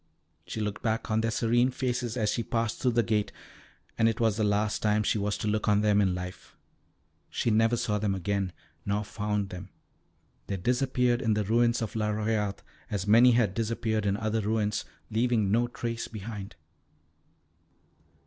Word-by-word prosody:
She -, -, -5 dB
looked 105 Hz, -1 st, -3 dB
back 115 Hz, -2 st, -1 dB
on 110 Hz, +1 st, +2 dB
their 115 Hz, -, 0 dB
serene 120 Hz, +2 st, +2 dB
faces 125 Hz, -2 st, -2 dB
as 105 Hz, -3 st, +1 dB
she -, -, -1 dB
passed 115 Hz, -1 st, -2 dB
through 125 Hz, -2 st, +2 dB
the 120 Hz, 0 st, +3 dB
gate, 105 Hz, -2 st, 0 dB, 0.7 s
and 115 Hz, 0 st, +5 dB
it 115 Hz, -, -3 dB
was 110 Hz, -3 st, +2 dB
the 110 Hz, -, 0 dB
last 105 Hz, 0 st, +1 dB
time 105 Hz, 0 st, +2 dB
she 105 Hz, -, +1 dB
was 100 Hz, 0 st, -1 dB
to -, -, -3 dB
look 105 Hz, +1 st, 0 dB
on 105 Hz, 0 st, +4 dB
them 105 Hz, -1 st, +3 dB
in 95 Hz, -2 st, +2 dB
life. 90 Hz, 0 st, -8 dB, 0.7 s
She 115 Hz, -, 0 dB
never 115 Hz, +2 st, +3 dB
saw 105 Hz, -2 st, 0 dB
them 100 Hz, -2 st, 0 dB
again, 95 Hz, 0 st, -1 dB, 0.3 s
nor 100 Hz, +1 st, -1 dB
found 105 Hz, -2 st, -2 dB
them. 95 Hz, +1 st, -8 dB, 0.8 s
They 100 Hz, -, -2 dB
disappeared 125 Hz, +3 st, +1 dB
in 110 Hz, -5 st, +1 dB
the 105 Hz, -, +1 dB
ruins 115 Hz, +3 st, +2 dB
of 110 Hz, -, -5 dB
La 105 Hz, -1 st, 0 dB
Royat 105 Hz, -1 st, -1 dB, 0.3 s
as 100 Hz, -2 st, -2 dB
many 120 Hz, +4 st, +6 dB
had 115 Hz, -5 st, +2 dB
disappeared 110 Hz, -1 st, -1 dB
in 100 Hz, 0 st, +1 dB
other 110 Hz, 0 st, -1 dB
ruins, 105 Hz, 0 st, 0 dB, 0.3 s
leaving 110 Hz, -3 st, +1 dB
no 120 Hz, +3 st, +3 dB
trace 115 Hz, -1 st, -4 dB
behind. 105 Hz, -2 st, -7 dB
110 Hz, 175 wpm, -28 LUFS, 105-115 Hz, 0.8 s, many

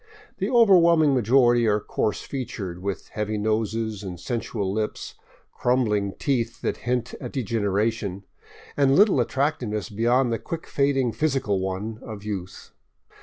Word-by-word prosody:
The -, -, -1 dB
overwhelming 170 Hz, -, +5 dB
majority 120 Hz, -1 st, +4 dB
are 105 Hz, 0 st, +3 dB
coarse 105 Hz, 0 st, -2 dB
featured, 100 Hz, -9 st, -5 dB
with 100 Hz, 0 st, -4 dB
heavy 105 Hz, 0 st, -3 dB
noses 110 Hz, 0 st, -1 dB
and 90 Hz, -4 st, -7 dB
sensual 110 Hz, -5 st, -3 dB
lips, 110 Hz, 0 st, -3 dB, 0.4 s
crumbling 105 Hz, -6 st, +1 dB
teeth 120 Hz, -5 st, -1 dB
that -, -, -1 dB
hint 125 Hz, -1 st, -1 dB
at -, -, -6 dB
degeneration, 105 Hz, -4 st, -1 dB, 0.5 s
and 140 Hz, -1 st, +3 dB
little 200 Hz, -, +5 dB
attractiveness 125 Hz, -4 st, -1 dB
beyond 120 Hz, +3 st, +2 dB
the 115 Hz, -, -2 dB
quick 165 Hz, +7 st, -6 dB
fading 135 Hz, -3 st, +1 dB
physical 130 Hz, -9 st, 0 dB
one 95 Hz, +4 st, -4 dB
of 105 Hz, -3 st, -8 dB
youth. 95 Hz, -3 st, -6 dB
115 Hz, 130 wpm, -24 LUFS, 105-130 Hz, 0.5 s, overwhelming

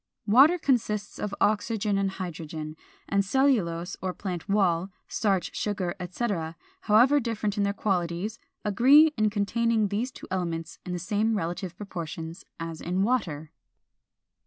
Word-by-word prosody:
Water 270 Hz, +11 st, +6 dB
consists 230 Hz, -, 0 dB
of 210 Hz, -1 st, -3 dB
oxygen 210 Hz, -1 st, +1 dB
and 195 Hz, 0 st, +1 dB
hydrogen; 160 Hz, -4 st, -6 dB, 0.3 s
and 200 Hz, 0 st, +2 dB
cellulose 195 Hz, -8 st, +1 dB
or 185 Hz, -1 st, -3 dB
plant 185 Hz, -1 st, -5 dB
wall, 190 Hz, -3 st, +2 dB, 0.2 s
starch, 195 Hz, -4 st, 0 dB
sugar, 195 Hz, -4 st, -1 dB
etc., 180 Hz, -3 st, -3 dB, 0.2 s
however 245 Hz, +7 st, +5 dB
different 220 Hz, -4 st, -2 dB
in 205 Hz, -, 0 dB
their 200 Hz, 0 st, +2 dB
qualities, 195 Hz, +1 st, -1 dB, 0.3 s
agree 275 Hz, +10 st, +6 dB
in 215 Hz, 0 st, +2 dB
containing 220 Hz, +1 st, +1 dB
these 215 Hz, +6 st, -1 dB
two -, -, -11 dB
elements 170 Hz, -3 st, -3 dB
in 180 Hz, -, -3 dB
the -, -, -1 dB
same 210 Hz, +5 st, 0 dB
relative 175 Hz, 0 st, -4 dB
proportions 170 Hz, -3 st, -6 dB, 0.2 s
as 165 Hz, -1 st, -5 dB
in 180 Hz, +3 st, 0 dB
water. 165 Hz, -11 st, -1 dB
200 Hz, 135 wpm, -27 LUFS, 175-220 Hz, 0.3 s, Water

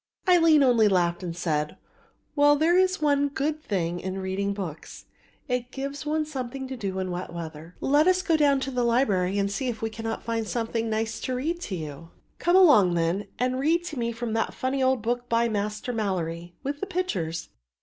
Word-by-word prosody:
Aline 330 Hz, -5 st, +6 dB
only 235 Hz, -4 st, +5 dB
laughed 175 Hz, -2 st, +1 dB
and 170 Hz, -2 st, -5 dB
said: 150 Hz, -3 st, -1 dB, 0.6 s
"Well, 290 Hz, 0 st, +5 dB
there 320 Hz, +4 st, +3 dB
is 370 Hz, -2 st, +2 dB
one 285 Hz, -1 st, +3 dB
good 295 Hz, +2 st, -2 dB
thing 175 Hz, -, -2 dB
in 190 Hz, +1 st, -4 dB
reading 190 Hz, +1 st, -2 dB
books, 180 Hz, -6 st, -7 dB, 0.4 s
it 250 Hz, -1 st, -2 dB
gives 275 Hz, +2 st, -5 dB
one 310 Hz, 0 st, 0 dB
something 265 Hz, -2 st, -5 dB
to 265 Hz, -, -4 dB
do 195 Hz, -5 st, -4 dB
in 185 Hz, -1 st, -2 dB
wet 180 Hz, +1 st, -5 dB
weather. 165 Hz, 0 st, -8 dB
Let 295 Hz, +4 st, +3 dB
us 370 Hz, 0 st, +3 dB
go 335 Hz, -4 st, +2 dB
down 285 Hz, -3 st, +3 dB
to 270 Hz, -, -3 dB
the 250 Hz, -1 st, 0 dB
library 205 Hz, -6 st, +2 dB
and 200 Hz, 0 st, 0 dB
see 260 Hz, +6 st, -2 dB
if 230 Hz, -2 st, -4 dB
I 225 Hz, -, 0 dB
cannot 225 Hz, 0 st, -5 dB
find 230 Hz, -1 st, -2 dB
something 230 Hz, 0 st, -2 dB
nice 220 Hz, 0 st, -2 dB
to 255 Hz, -, -3 dB
read 320 Hz, +7 st, -2 dB
to 195 Hz, -, -4 dB
you." 155 Hz, 0 st, -7 dB, 0.3 s
"Come 345 Hz, +1 st, +2 dB
along, 245 Hz, -, +6 dB
then, 170 Hz, +4 st, 0 dB
and 255 Hz, +1 st, 0 dB
read 330 Hz, +5 st, +2 dB
to 300 Hz, -, -6 dB
me 235 Hz, 0 st, 0 dB
from 230 Hz, -1 st, -4 dB
that 225 Hz, 0 st, -1 dB
funny 265 Hz, +1 st, -1 dB
old 260 Hz, -3 st, +2 dB
book 245 Hz, +1 st, -2 dB
by 235 Hz, 0 st, +3 dB
Master 215 Hz, +2 st, -2 dB
Malory, 175 Hz, -5 st, -3 dB
with 285 Hz, +1 st, -3 dB
the 395 Hz, -, -3 dB
pictures." 190 Hz, -, -2 dB
235 Hz, 200 wpm, -26 LUFS, 190-285 Hz, 0.6 s, Aline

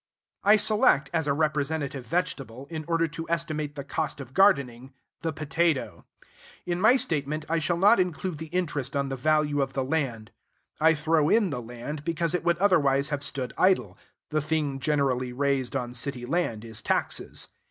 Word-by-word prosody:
I 210 Hz, +2 st, +6 dB
select 210 Hz, -, +3 dB
as 160 Hz, -3 st, 0 dB
a 140 Hz, -, +2 dB
representative 145 Hz, -3 st, -1 dB
vegetable, 135 Hz, -5 st, -3 dB
in 155 Hz, -2 st, -5 dB
order 165 Hz, -1 st, +1 dB
to 165 Hz, +1 st, -7 dB
estimate 155 Hz, -3 st, -2 dB
the 140 Hz, -, -5 dB
cost 150 Hz, +2 st, -3 dB
of 130 Hz, -2 st, -9 dB
gardening, 135 Hz, -9 st, +2 dB, 0.3 s
the 165 Hz, 0 st, -1 dB
potato. 155 Hz, 0 st, -1 dB, 0.6 s
In 175 Hz, 0 st, -2 dB
my 235 Hz, +5 st, +6 dB
statement, 155 Hz, -, -1 dB
I 165 Hz, +1 st, +1 dB
shall 170 Hz, +2 st, 0 dB
not 200 Hz, +4 st, +5 dB
include 180 Hz, -2 st, -2 dB
the 160 Hz, -, -6 dB
interest 150 Hz, -6 st, -2 dB
on 140 Hz, -1 st, 0 dB
the 135 Hz, -, -2 dB
value 150 Hz, +1 st, +1 dB
of 135 Hz, 0 st, -2 dB
the 135 Hz, -, -1 dB
land. 130 Hz, -7 st, -2 dB, 0.5 s
I 160 Hz, +1 st, +5 dB
throw 155 Hz, 0 st, +2 dB
in 215 Hz, -5 st, +3 dB
the 125 Hz, -3 st, -3 dB
land, 120 Hz, +6 st, -7 dB
because 170 Hz, +1 st, -1 dB
it 180 Hz, -, -1 dB
would 170 Hz, 0 st, +2 dB
otherwise 150 Hz, -7 st, +3 dB
have 145 Hz, -2 st, -2 dB
stood 130 Hz, -3 st, -2 dB
idle: 125 Hz, -, +3 dB, 0.4 s
the 155 Hz, 0 st, +1 dB
thing 150 Hz, -2 st, -1 dB
generally 130 Hz, -4 st, 0 dB
raised 135 Hz, -1 st, 0 dB
on 125 Hz, -2 st, -3 dB
city 125 Hz, 0 st, -2 dB
land 120 Hz, -7 st, -1 dB
is 110 Hz, -2 st, -6 dB
taxes. -, -, -1 dB
150 Hz, 175 wpm, -27 LUFS, 135-165 Hz, 0.6 s, I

